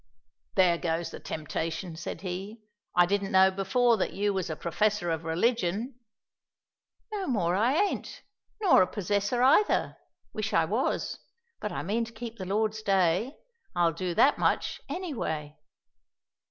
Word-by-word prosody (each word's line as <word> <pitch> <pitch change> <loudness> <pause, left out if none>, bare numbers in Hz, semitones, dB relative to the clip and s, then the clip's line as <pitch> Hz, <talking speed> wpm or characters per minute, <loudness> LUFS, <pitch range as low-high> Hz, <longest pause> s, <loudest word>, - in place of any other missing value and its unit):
"There 180 -3 +4
goes 165 -1 -2
the - - -8
temptation," 160 +2 -4
said 165 - -6
he. 195 +4 -6 0.3
"I 175 0 +6
didn't 200 +1 -1
know 190 0 +6
before 225 +5 +2
that 190 - -1
you 205 +1 0
was 190 -3 -2
a 155 - -2
professor 200 +2 0
of 160 0 -2
religion." 225 +6 0 1.1
"No 405 -3 -3
more 185 -10 +1
I 230 +8 +2
ain't, 405 +4 -1 0.4
nor 390 - +5
a 185 - +3
possessor 205 +5 0
either; 310 +11 +3 0.4
wish - - -3
I - - +4
was; - - -1 0.4
but 210 - -4
I - - -4
mean 220 +6 0
to 225 - -11
keep 230 -2 -8
the 185 - -4
Lord's 215 +2 0
day; 195 - +1 0.4
I'll 170 -1 +3
do 175 +1 -3
that 280 +10 +4
much, - - 0
any 360 -3 -4
way." 150 - -4
195 Hz, 155 wpm, -28 LUFS, 175-230 Hz, 1.1 s, I